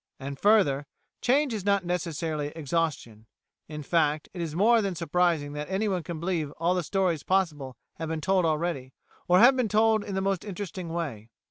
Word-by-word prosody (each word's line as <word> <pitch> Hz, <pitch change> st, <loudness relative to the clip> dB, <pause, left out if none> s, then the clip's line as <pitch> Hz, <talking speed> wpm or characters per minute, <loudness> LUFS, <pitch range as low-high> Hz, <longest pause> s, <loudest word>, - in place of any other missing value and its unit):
And, 135 Hz, 0 st, -6 dB
further, 150 Hz, -10 st, +3 dB, 0.3 s
change 270 Hz, +1 st, +2 dB
is 210 Hz, -4 st, -3 dB
not 200 Hz, -2 st, +1 dB
necessarily 165 Hz, -3 st, -2 dB
exhaustion; 145 Hz, -8 st, -3 dB, 0.4 s
in 150 Hz, -1 st, -7 dB
fact, 155 Hz, -1 st, +1 dB
it 180 Hz, -, -5 dB
is 160 Hz, -2 st, -4 dB
more 225 Hz, +5 st, +4 dB
than 195 Hz, -3 st, -2 dB
surprising 165 Hz, -3 st, 0 dB
that 150 Hz, +2 st, -5 dB
anyone 190 Hz, -1 st, 0 dB
can 165 Hz, -1 st, -6 dB
believe 170 Hz, -3 st, -1 dB
all 170 Hz, +2 st, 0 dB
the 180 Hz, -, 0 dB
stories 175 Hz, -2 st, 0 dB
possible 150 Hz, -10 st, -1 dB, 0.2 s
have 160 Hz, 0 st, -4 dB
been 160 Hz, -1 st, -2 dB
told 190 Hz, +3 st, +2 dB
already, 155 Hz, -5 st, -1 dB, 0.3 s
or 180 Hz, -, +5 dB
have 245 Hz, +6 st, +7 dB
been 250 Hz, -4 st, 0 dB
told 220 Hz, 0 st, +3 dB
in 200 Hz, -, -5 dB
the -, -, +1 dB
most 195 Hz, -2 st, -1 dB
interesting 190 Hz, -3 st, -6 dB
way. 140 Hz, -10 st, -4 dB
170 Hz, 185 wpm, -27 LUFS, 150-195 Hz, 0.4 s, have